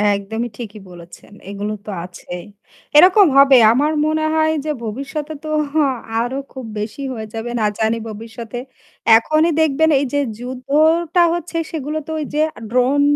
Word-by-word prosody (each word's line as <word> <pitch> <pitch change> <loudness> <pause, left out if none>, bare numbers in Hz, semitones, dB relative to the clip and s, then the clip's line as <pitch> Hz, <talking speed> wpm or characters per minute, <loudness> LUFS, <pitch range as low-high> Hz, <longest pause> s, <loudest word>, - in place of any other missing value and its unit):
একদমই 220 +4 -4
ঠিকই 220 -3 -8
বলেছেন 175 +3 -14 0.2
এগুলো 205 +1 -4
তো - - -8 0.2
আছেই। 180 -1 -9 0.5
এরকম 370 +3 +7
হবে 275 -1 +7 0.2
আমার 290 +6 +2
মনে 310 0 0
হয় 315 0 +3
যে 310 - -2
ভবিষ্যতে 280 +7 -5
তো 310 - -6 0.7
আরও 245 +3 -2 0.2
খুব 260 -2 -8
বেশি 215 +6 -5
হয়ে 220 -2 -6
যাবে 225 +2 -4
না - - 0 0.2
জানি 225 +1 +1
ভবিষ্যতে 225 +2 -8 0.6
এখনই 310 +7 +2
দেখবেন 315 +1 +3
এই 285 - 0
যে 285 - +2 0.2
যুদ্ধটা 310 +7 +2
হচ্ছে 345 0 -4
সেগুলো 305 -1 -3
তো 320 - -5
ওই 300 - -3
যে 300 - -1 0.2
আ - - -9
ড্রোন 255 +4 +2
265 Hz, 155 wpm, -19 LUFS, 225-310 Hz, 0.7 s, এরকম